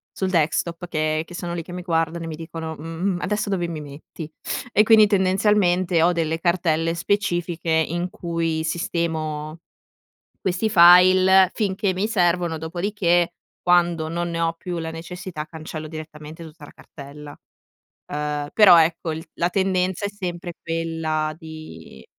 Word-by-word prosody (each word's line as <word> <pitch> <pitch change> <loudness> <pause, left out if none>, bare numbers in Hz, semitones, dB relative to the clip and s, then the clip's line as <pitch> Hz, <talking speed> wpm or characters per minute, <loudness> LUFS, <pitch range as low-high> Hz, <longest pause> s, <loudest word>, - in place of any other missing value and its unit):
sul 190 - -1
desktop, 170 +1 0
che 155 -1 -1
che 175 - -13
sono 175 0 -5
lì 170 - -4
che 175 - -10
mi 180 - -5
guardano, 165 -1 -1
e - - -6
mi 160 - -5
dicono: 160 0 -7
"Mhmm, 165 +3 -7
mhmm, 175 - -2
adesso 210 +2 -1
dove 180 -3 -1
mi 160 -2 -5
metti?" 150 +2 -10 0.4
E 215 - +5
quindi 220 -1 +6
tendenzialmente 185 -3 +2
ho 175 - +4
delle 165 -1 -1
cartelle 165 -2 +1
specifiche 175 -2 -1
in 170 +3 0
cui 165 -2 -2
sistemo, 160 -2 -3 0.8
questi 190 +4 -1
file, 185 +2 +7
finché 195 -2 -1
mi 190 +3 -1
servono, 175 -5 +1
dopodiché, 175 +1 0 0.3
quando 175 -2 +2
non 170 +1 -2
ne 165 0 -3
ho 165 0 +1
più 175 +1 -6
la 160 0 -4
necessità, 165 -1 -7
cancello 155 -1 -8
direttamente 155 0 -9
tutta 155 -2 -12
la - - -14
cartella, 145 +1 -12 0.8
uhm, 150 0 -3
però 205 -5 +8
ecco, 165 0 +1
il 160 +1 -6
la 175 - 0
tendenza 190 0 0
è 200 - -1
sempre 180 -3 -6
quella 165 -2 -2
di 155 - -11
170 Hz, 150 wpm, -22 LUFS, 160-180 Hz, 0.8 s, però